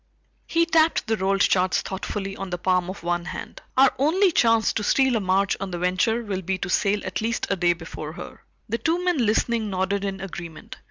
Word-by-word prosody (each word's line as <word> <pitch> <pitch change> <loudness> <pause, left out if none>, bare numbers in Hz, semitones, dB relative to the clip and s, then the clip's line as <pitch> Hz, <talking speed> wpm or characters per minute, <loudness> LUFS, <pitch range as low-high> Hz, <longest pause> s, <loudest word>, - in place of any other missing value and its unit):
He 335 0 +2
tapped 325 -1 +3
the 220 -1 +1
rolled 195 -1 0
charts 185 0 +2
thoughtfully 195 +1 -4
on 195 -1 -6
the 175 - -3
palm 180 0 +1
of 185 - -7
one 175 0 -1
hand. - - -7 0.2
"Our 265 0 +6
only 355 +7 +3
chance 230 -6 +3
to 210 - -2
steal 265 +3 +3
a - - +2
march 195 0 +1
on 195 0 -4
the 175 - -4
Venture 185 +7 +1
will 195 -3 -3
be 190 +1 -2
to 195 - -4
sail 205 -1 +1
at - - -3
least 230 +1 -1
a - - +3
day 175 -1 +2
before 160 -2 -8
her." - - -10 0.2
The 230 +2 -2
two 335 +8 0
men 345 -9 +2
listening 220 0 +1
nodded 190 +1 -1
in 195 -1 -3
agreement. 170 -4 -8
195 Hz, 215 wpm, -24 LUFS, 185-230 Hz, 0.2 s, Our